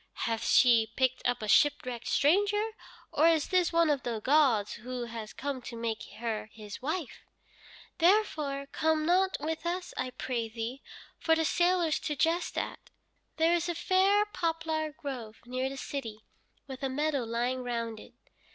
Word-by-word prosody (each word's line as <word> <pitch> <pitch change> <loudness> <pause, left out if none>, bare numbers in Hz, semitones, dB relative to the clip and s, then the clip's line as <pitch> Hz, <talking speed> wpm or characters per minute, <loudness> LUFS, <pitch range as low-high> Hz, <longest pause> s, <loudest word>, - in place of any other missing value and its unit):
Hath 225 0 -1
she 235 -3 +5
picked 260 -1 +1
up 245 -2 -1
a - - -3
shipwrecked 250 -1 +2
stranger, 410 +8 +2 0.4
or 310 +3 +4
is 325 -3 +3
this 365 -2 +2
one 335 -1 +4
of 280 -3 0
the 235 -3 -3
gods 255 -5 +3
who 250 +2 -5
has 225 -2 -7
come 275 -2 -4
to 235 - -8
make 230 -1 -3 0.2
her 225 -2 -3
his 210 0 -9
wife?' 310 0 -3 0.8
Therefore 315 -7 +2
come 315 -1 +1
not 375 +3 +3
with 315 +2 -3
us, 355 +1 -3
I 255 0 -1
pray 240 -2 -3
thee, 230 +4 -5 0.4
for 325 - +3
the 320 0 +1
sailors 345 -1 +2
to 300 - -3
jest 330 +4 0
at. - - -4 0.5
There 325 +1 +4
is 345 0 0
a 345 - -1
fair 385 +4 +3
poplar 325 -5 -2
grove 245 -7 -7
near 255 +2 -2
the 275 - -7
city, 230 -7 -5 0.4
with 265 -2 -8
a 270 - -1
meadow 290 0 0
lying 240 +3 -1
round 230 -2 -3
it. - - -14
280 Hz, 165 wpm, -30 LUFS, 240-330 Hz, 0.8 s, she